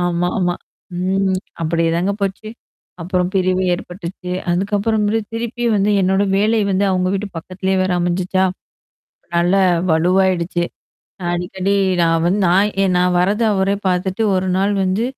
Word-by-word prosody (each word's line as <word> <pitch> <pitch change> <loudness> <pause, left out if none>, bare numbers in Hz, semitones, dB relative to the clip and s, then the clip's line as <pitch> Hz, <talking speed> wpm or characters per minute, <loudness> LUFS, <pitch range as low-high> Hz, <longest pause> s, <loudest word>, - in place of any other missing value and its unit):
ஆமாமா. 175 +1 0 0.4
ம். 190 0 0 0.2
அப்படியேதாங்க 165 +3 0
போச்சு. 195 +2 -3 0.5
அப்புறம் 180 +1 -1
பிரிவு 185 0 +1
ஏற்பட்டுச்சு. 180 0 -8 0.2
அதுக்கப்புறமேலு 205 +4 0
திருப்பி 235 +1 -4
வந்து 200 +1 +2
என்னோட 190 +2 +2 0.2
வேலை 220 +2 +2
வந்து 195 +1 +1
அவுங்க 185 0 +1
வீட்டு 200 +1 -3
பக்கத்திலேயே 190 +2 -2
வேற 185 -1 0
அமஞ்சுச்சா. 180 +2 0 0.9
நல்லா 180 +3 +3 0.3
வலுவாயிடுச்சு. 175 +1 +2 0.6
அ - - -5
அடிக்கடி 185 +3 -2 0.3
நான் 165 -1 +2
வந் 185 +4 +2
நான் 195 +4 +3
ஏ - - +3
நான் 180 0 +2
வரது 205 +5 +1
அவரே 195 0 +1
பாத்துட்டு 185 +3 -1
ஒரு 185 0 -1
நாள் 195 +2 +1
வந்து 190 +5 0
185 Hz, 130 wpm, -18 LUFS, 180-200 Hz, 0.9 s, நல்லா